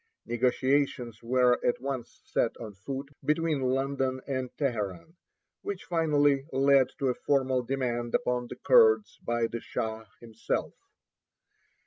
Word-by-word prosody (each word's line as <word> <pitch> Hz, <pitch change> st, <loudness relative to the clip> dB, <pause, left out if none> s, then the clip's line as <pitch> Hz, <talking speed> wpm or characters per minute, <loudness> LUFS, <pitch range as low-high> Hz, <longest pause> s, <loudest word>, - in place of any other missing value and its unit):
Negotiations 125 Hz, -1 st, 0 dB
were 125 Hz, +1 st, +2 dB
at 120 Hz, -, +1 dB
once 130 Hz, -2 st, -5 dB
set 115 Hz, -, 0 dB
on 110 Hz, -3 st, -8 dB
foot 135 Hz, +8 st, -6 dB
between 155 Hz, -1 st, +1 dB
London 130 Hz, 0 st, 0 dB
and 130 Hz, -2 st, -2 dB
Teheran, 115 Hz, -, -3 dB, 0.5 s
which 200 Hz, -2 st, -5 dB
finally 145 Hz, -5 st, +2 dB
led 135 Hz, -1 st, +4 dB
to 135 Hz, -, 0 dB
a -, -, +2 dB
formal 130 Hz, -1 st, +1 dB
demand 120 Hz, -2 st, -2 dB
upon 125 Hz, 0 st, 0 dB
the -, -, -7 dB
Kurds 450 Hz, -, +4 dB
by 120 Hz, 0 st, 0 dB
the 115 Hz, +1 st, -4 dB
Shah 110 Hz, 0 st, -4 dB
himself. 115 Hz, -1 st, -3 dB
130 Hz, 125 wpm, -28 LUFS, 120-140 Hz, 0.5 s, led